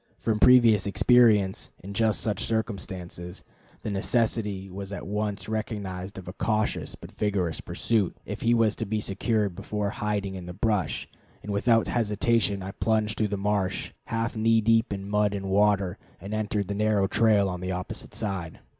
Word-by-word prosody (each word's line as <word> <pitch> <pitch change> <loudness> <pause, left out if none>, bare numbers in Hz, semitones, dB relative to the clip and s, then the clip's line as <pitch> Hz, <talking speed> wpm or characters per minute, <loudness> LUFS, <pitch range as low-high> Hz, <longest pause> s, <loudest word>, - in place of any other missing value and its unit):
From 110 -2 -1
previous 115 -5 +6
experience 105 -3 +4
in 100 +2 -7
just 110 +1 +1
such 105 -2 -1
circumstances, 95 -5 -4 0.4
the 105 - -3
necessity 105 -1 0
was 95 +1 -7
at 100 - -6
once 105 -1 -2
recognized 100 -3 -4
of 95 -1 -9
a 90 - -6
cautious 110 0 -1
but - - -12
vigorous 95 -6 -1
pursuit, 110 -6 0
if - - -6
he 120 +1 +3
was 115 -2 +3
to 110 - -3
be 110 +1 -1
secured 105 0 0
before 105 +2 -3
hiding 105 -2 -2
in 90 -2 -7
the 90 - -6
brush; 105 -1 0 0.4
and 105 - -5
without 115 +2 +3
hesitation 105 -3 +1
I 95 - -5
plunged 110 0 0
through 110 - +1
the 100 0 -3
marsh, 100 -1 -1
half 115 +1 -2
knee 115 +1 +3
deep 115 +1 +3
in 100 0 -4
mud 105 0 +1
and 95 -1 -4
water, 100 -1 +2 0.2
and 100 +2 -7
entered 105 -2 -1
the 100 - -2
narrow 105 -1 +2
trail 105 -1 +3
on 90 -1 -4
the 90 +1 -3
opposite 90 0 -5
side. 95 -7 -3
105 Hz, 170 wpm, -27 LUFS, 95-110 Hz, 0.4 s, previous